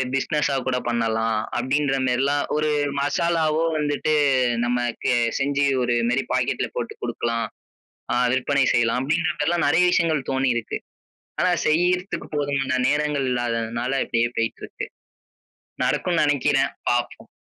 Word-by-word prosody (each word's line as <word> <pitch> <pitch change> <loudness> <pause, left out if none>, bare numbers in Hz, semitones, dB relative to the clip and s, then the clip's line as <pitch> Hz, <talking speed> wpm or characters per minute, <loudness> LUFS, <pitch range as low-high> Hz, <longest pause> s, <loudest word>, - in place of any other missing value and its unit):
பிஸ்னஸ்ஸா 140 +1 0
கூடப் 125 -1 -1
பண்ணலாம். 115 -1 0 0.2
அப்டின்ற 135 +2 +1
மாரிலாம் 140 +3 +1
ஒரு 155 0 +1 0.3
மசாலாவோ 160 +2 +1
வந்துட்டு, 150 +1 0 0.5
நமக்கு 120 0 0 0.3
செஞ்சு 140 +1 +1 0.2
ஒரு 120 - +1
இது 115 - 0
மாரி 125 +2 +1
ஒரு - - -11
பாக்கெட்ல - - 0
போட்டு - - -3
குடுக்கலாம், 115 -1 -2 0.7
அ - - +1 0.2
விற்பனை 135 +1 +2
செய்யலாம். 120 +1 +2
அப்டின்ற 160 +5 +1
மாரிலாம் 165 +3 +1
நிறையா 170 +5 +4
விஷயங்கள் 160 -6 +1
தோணியிருக்கு. 130 -4 0 0.6
ஆனா 185 - +3 0.2
செய்யறதுக்கு 180 +4 +1
போதுமான 135 -2 0
நேரங்கள் 150 -2 0
இல்லாததுனால 120 0 -2
அப்டியே 115 0 +1
போயிட்டுருக்கு. 115 0 -3 1.0
நடக்கும் 175 -2 +1
நினைக்கிறேன். 140 -1 +2 0.2
பாப்போம். 120 0 -2
135 Hz, 120 wpm, -23 LUFS, 120-150 Hz, 1.0 s, நிறையா